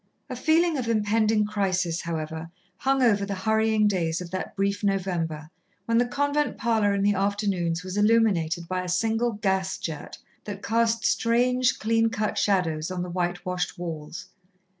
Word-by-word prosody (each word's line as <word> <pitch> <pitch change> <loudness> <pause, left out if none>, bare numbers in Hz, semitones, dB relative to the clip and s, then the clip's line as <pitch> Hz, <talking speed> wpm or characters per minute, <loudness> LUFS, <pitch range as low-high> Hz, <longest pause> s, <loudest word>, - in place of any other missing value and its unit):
A - - -3
feeling 320 +3 +2
of 240 - -3
impending 215 -1 +2
crisis, 185 -5 -1
however, 160 0 -4 0.3
hung 270 +3 +1
over 205 -4 +3
the 200 0 -3
hurrying 220 +2 +2
days 170 -5 0
of 175 -2 -8
that 185 - -4
brief 200 +1 -1
November, 175 -6 -1 0.3
when 230 0 +2
the 245 - +2
convent 285 +3 0
parlour 220 -3 +2
in 200 - 0
the 205 0 +3
afternoons 195 -4 -1
was 185 +2 -5
illuminated 200 -7 +2
by 185 +1 -1
a 180 - -5
single 225 +5 +1
gas 190 -2 -1
jet 160 -3 -6 0.3
that 200 -1 -7
cast 230 0 +1
strange, 250 +2 +2
clean 225 +1 +2
cut 215 -1 -2
shadows 170 -6 +1
on 180 -1 -3
the 180 - -6
white 175 0 -2
washed 180 +1 -2
walls. 165 -3 -6
200 Hz, 160 wpm, -26 LUFS, 180-225 Hz, 0.3 s, over